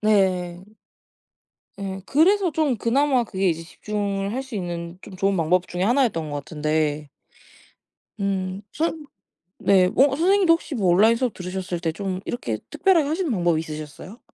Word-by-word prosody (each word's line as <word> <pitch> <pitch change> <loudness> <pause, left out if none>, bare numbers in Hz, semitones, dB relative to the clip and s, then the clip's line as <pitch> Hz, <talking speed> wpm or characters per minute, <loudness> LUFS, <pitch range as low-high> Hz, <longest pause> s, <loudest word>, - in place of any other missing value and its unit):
네. 185 -4 +1 1.1
예 195 -1 -5
그래서 360 - +3
좀 290 -5 +1
그나마 255 +3 +2
그게 195 -3 0
이제 165 -1 -1
집중을 200 +2 -3
할 260 - -1
수 265 -4 -10
있는 175 -1 -5
좀 190 - -10
좋은 195 +1 +1
방법 175 +2 +1
중에 180 +1 -3
하나였던 220 - +1
것 145 - -3
같은데 150 0 -1 1.1
음 195 -1 -2
선 315 0 -2 0.5
네 190 -2 +4
뭐 265 +9 +4
선생님도 365 +2 +4
혹시 325 -3 -3
뭐 200 -5 0
온라인 220 +5 +5
수업 245 -2 -1
들으셨을 180 -1 -4
때 165 -2 -1
좀 190 0 -3
이렇게 115 - -3
특별하게 350 -6 +3
하시는 325 0 -1
방법이 175 -6 +1
있으셨어요? 155 - -8
195 Hz, 315 characters per minute, -23 LUFS, 175-255 Hz, 1.1 s, 온라인